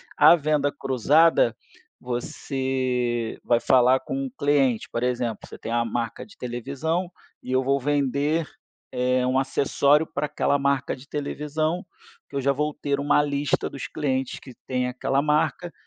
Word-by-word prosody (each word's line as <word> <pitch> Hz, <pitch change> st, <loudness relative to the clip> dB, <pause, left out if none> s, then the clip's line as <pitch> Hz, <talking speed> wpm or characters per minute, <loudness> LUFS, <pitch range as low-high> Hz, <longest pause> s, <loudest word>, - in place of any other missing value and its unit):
A -, -, +8 dB
venda 150 Hz, -2 st, +1 dB
cruzada, 135 Hz, 0 st, +3 dB, 0.5 s
você 125 Hz, -1 st, -2 dB
vai 120 Hz, -1 st, +3 dB
falar 130 Hz, +1 st, +4 dB
com 275 Hz, -, -4 dB
o 265 Hz, -, -6 dB
cliente, 140 Hz, -, +1 dB
por 115 Hz, -, -3 dB
exemplo, 120 Hz, -3 st, -1 dB
você -, -, -11 dB
tem 115 Hz, -, -6 dB
a 120 Hz, 0 st, +2 dB
marca 115 Hz, 0 st, -3 dB
de 205 Hz, -, -18 dB
televisão 150 Hz, +9 st, -3 dB, 0.3 s
e 125 Hz, -, -6 dB
eu 130 Hz, 0 st, +3 dB
vou 135 Hz, +1 st, +2 dB
vender, 145 Hz, +3 st, 0 dB, 0.4 s
eh, 125 Hz, 0 st, +1 dB
um 130 Hz, +1 st, +1 dB
acessório 140 Hz, +3 st, +2 dB
para 150 Hz, -, -2 dB
aquela 140 Hz, -, +1 dB
marca 140 Hz, -1 st, 0 dB
de 135 Hz, +2 st, -16 dB
televisão, 150 Hz, +3 st, -2 dB, 0.4 s
que -, -, -5 dB
eu -, -, 0 dB
já 140 Hz, +1 st, +2 dB
vou 150 Hz, +2 st, -1 dB
ter 140 Hz, -1 st, -2 dB
uma 145 Hz, +1 st, +3 dB
lista 145 Hz, 0 st, -1 dB
dos 140 Hz, -, -7 dB
clientes 135 Hz, -4 st, -2 dB
que 130 Hz, -, -12 dB
tem 125 Hz, -1 st, -1 dB
aquela 135 Hz, +2 st, 0 dB
marca, 155 Hz, +3 st, 0 dB
140 Hz, 160 wpm, -24 LUFS, 125-150 Hz, 0.5 s, A